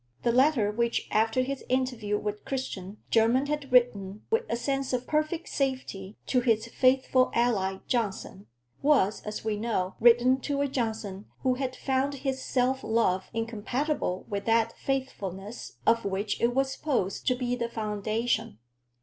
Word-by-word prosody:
The 235 Hz, -, +3 dB
letter 255 Hz, -4 st, +3 dB
which, 235 Hz, +2 st, 0 dB
after 225 Hz, +3 st, +2 dB
his 275 Hz, +1 st, -4 dB
interview 250 Hz, -5 st, 0 dB
with 210 Hz, 0 st, -4 dB
Christian, 215 Hz, -7 st, -4 dB
Jermyn 235 Hz, +4 st, +4 dB
had 290 Hz, -2 st, -3 dB
written 215 Hz, -5 st, +2 dB
with 455 Hz, +1 st, +2 dB
a -, -, +1 dB
sense 270 Hz, +2 st, -1 dB
of 250 Hz, 0 st, -1 dB
perfect 310 Hz, +3 st, -1 dB
safety 255 Hz, -8 st, -3 dB
to 255 Hz, -, +2 dB
his 225 Hz, -3 st, +2 dB
faithful 255 Hz, +1 st, +3 dB
ally 195 Hz, -6 st, +1 dB
Johnson, 205 Hz, -4 st, -2 dB, 0.3 s
was, 270 Hz, -9 st, +3 dB
as 210 Hz, 0 st, -6 dB
we 215 Hz, -1 st, 0 dB
know, 205 Hz, -4 st, -1 dB
written 240 Hz, +3 st, +5 dB
to 280 Hz, 0 st, -1 dB
a 285 Hz, -, +2 dB
Johnson 220 Hz, -6 st, -3 dB, 0.2 s
who 260 Hz, -1 st, +2 dB
had 255 Hz, 0 st, -3 dB
found 270 Hz, +2 st, 0 dB
his 265 Hz, -1 st, -3 dB
self 260 Hz, +1 st, +1 dB
love 205 Hz, -5 st, +1 dB
incompatible 230 Hz, 0 st, -2 dB
with 200 Hz, -1 st, -3 dB
that 230 Hz, 0 st, +2 dB
faithfulness 215 Hz, -6 st, -4 dB
of 230 Hz, 0 st, +4 dB
which 200 Hz, +1 st, -2 dB
it 240 Hz, +1 st, +2 dB
was 270 Hz, 0 st, +1 dB
supposed 245 Hz, -12 st, -2 dB
to 255 Hz, -, +4 dB
be 245 Hz, -1 st, -1 dB
the 235 Hz, -1 st, -2 dB
foundation. 215 Hz, -, -1 dB
235 Hz, 155 wpm, -28 LUFS, 210-265 Hz, 0.3 s, written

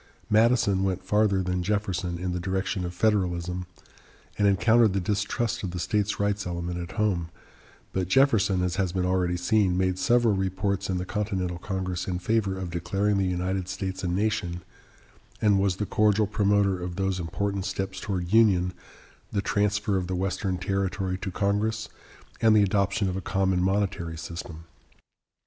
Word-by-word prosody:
Madison 110 Hz, -3 st, +4 dB
went 95 Hz, -1 st, -1 dB
farther 100 Hz, -1 st, +2 dB
than 90 Hz, 0 st, -1 dB
Jefferson 95 Hz, -3 st, -1 dB
in 90 Hz, +1 st, -3 dB
the 90 Hz, -, -2 dB
direction 95 Hz, +1 st, -2 dB
of 90 Hz, -, -3 dB
Federalism, 90 Hz, -3 st, 0 dB, 0.7 s
and 105 Hz, -, +2 dB
encountered 110 Hz, +3 st, +4 dB
the 100 Hz, -, +1 dB
distrust 105 Hz, +5 st, -1 dB
of 95 Hz, -, -3 dB
the 90 Hz, 0 st, -5 dB
states 105 Hz, +4 st, 0 dB
rights 100 Hz, -1 st, 0 dB
element 85 Hz, 0 st, -3 dB
at 85 Hz, 0 st, -6 dB
home; 95 Hz, -6 st, 0 dB, 0.6 s
but 95 Hz, -2 st, -1 dB
Jefferson, 100 Hz, -5 st, +3 dB
as 90 Hz, 0 st, -1 dB
has 95 Hz, -3 st, 0 dB
been 90 Hz, 0 st, -1 dB
already 90 Hz, -1 st, +1 dB
seen, 90 Hz, 0 st, +2 dB
made 95 Hz, 0 st, 0 dB
several 120 Hz, +3 st, +3 dB
reports 95 Hz, +1 st, -1 dB
in 95 Hz, -, 0 dB
the 90 Hz, -, -3 dB
Continental 95 Hz, -5 st, -2 dB
Congress 95 Hz, -1 st, -3 dB
in 90 Hz, -2 st, -1 dB
favor 100 Hz, +1 st, 0 dB
of 90 Hz, -2 st, -5 dB
declaring 100 Hz, +4 st, 0 dB
the 95 Hz, -, +1 dB
United 90 Hz, +1 st, -2 dB
States 95 Hz, 0 st, -4 dB
a -, -, 0 dB
nation, 90 Hz, -2 st, -1 dB, 0.8 s
and 105 Hz, -4 st, +3 dB
was 95 Hz, -2 st, +1 dB
the 105 Hz, -, -2 dB
cordial 105 Hz, +1 st, +3 dB
promoter 100 Hz, -2 st, +1 dB
of 90 Hz, 0 st, -4 dB
those 95 Hz, -1 st, -1 dB
important 100 Hz, +4 st, -2 dB
steps 95 Hz, 0 st, -3 dB
towards 90 Hz, -2 st, -3 dB
union, 95 Hz, -6 st, +4 dB, 0.6 s
the 100 Hz, -, 0 dB
transfer 105 Hz, 0 st, +1 dB
of 90 Hz, -1 st, -2 dB
the 95 Hz, -, -2 dB
Western 95 Hz, 0 st, -1 dB
territory 95 Hz, 0 st, -1 dB
to 95 Hz, +1 st, -5 dB
Congress 105 Hz, +3 st, -1 dB, 0.5 s
and 110 Hz, -1 st, +5 dB
the 105 Hz, -, +6 dB
adoption 100 Hz, 0 st, +1 dB
of 90 Hz, -, -2 dB
a 95 Hz, -, -3 dB
common 95 Hz, 0 st, +1 dB
monetary 95 Hz, -3 st, -1 dB
system. 85 Hz, 0 st, -7 dB
95 Hz, 165 wpm, -26 LUFS, 90-105 Hz, 0.8 s, the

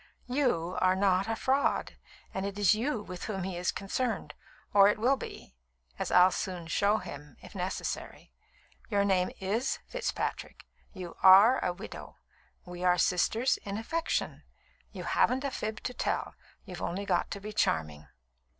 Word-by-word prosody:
"You 245 Hz, -, 0 dB
are 185 Hz, 0 st, +4 dB
not 190 Hz, 0 st, +2 dB
a 225 Hz, -, -1 dB
fraud, 270 Hz, +4 st, 0 dB, 0.4 s
and 190 Hz, -, -3 dB
it 200 Hz, 0 st, -4 dB
is 205 Hz, -2 st, +5 dB
you 225 Hz, 0 st, -1 dB
with 180 Hz, -2 st, -7 dB
whom 195 Hz, -4 st, -3 dB
he 185 Hz, -1 st, -4 dB
is 175 Hz, +1 st, 0 dB
concerned, 225 Hz, +5 st, -3 dB, 0.4 s
or 200 Hz, -1 st, +8 dB
it 210 Hz, -, +1 dB
will 245 Hz, +5 st, +3 dB
be, 260 Hz, -, -9 dB, 0.5 s
as -, -, -2 dB
I'll 180 Hz, +1 st, +6 dB
soon 180 Hz, -4 st, -4 dB
show 200 Hz, +5 st, +2 dB
him, 145 Hz, -7 st, -9 dB
if -, -, -12 dB
necessary. 185 Hz, -1 st, -4 dB, 0.6 s
Your 200 Hz, -2 st, +2 dB
name 185 Hz, -2 st, +2 dB
is 215 Hz, +7 st, -1 dB
Fitzpatrick; -, -, -4 dB, 0.3 s
you 180 Hz, -4 st, -8 dB
are 200 Hz, +7 st, +8 dB
a 180 Hz, -, +1 dB
widow; 175 Hz, -, -9 dB, 0.5 s
we 180 Hz, 0 st, -7 dB
are 180 Hz, 0 st, +4 dB
sisters 220 Hz, +9 st, +2 dB
in 200 Hz, -1 st, -4 dB
affection. 325 Hz, +9 st, -2 dB, 0.5 s
You -, -, -7 dB
haven't 260 Hz, +2 st, +2 dB
a 275 Hz, -, -2 dB
fib 215 Hz, -3 st, -4 dB
to 250 Hz, -, -3 dB
tell; -, -, -2 dB, 0.3 s
you've 180 Hz, -4 st, -8 dB
only 195 Hz, +3 st, -3 dB
got 180 Hz, -3 st, 0 dB
to 200 Hz, -, -5 dB
be 210 Hz, +2 st, -7 dB
charming." 75 Hz, -, 0 dB
200 Hz, 160 wpm, -30 LUFS, 180-225 Hz, 0.6 s, or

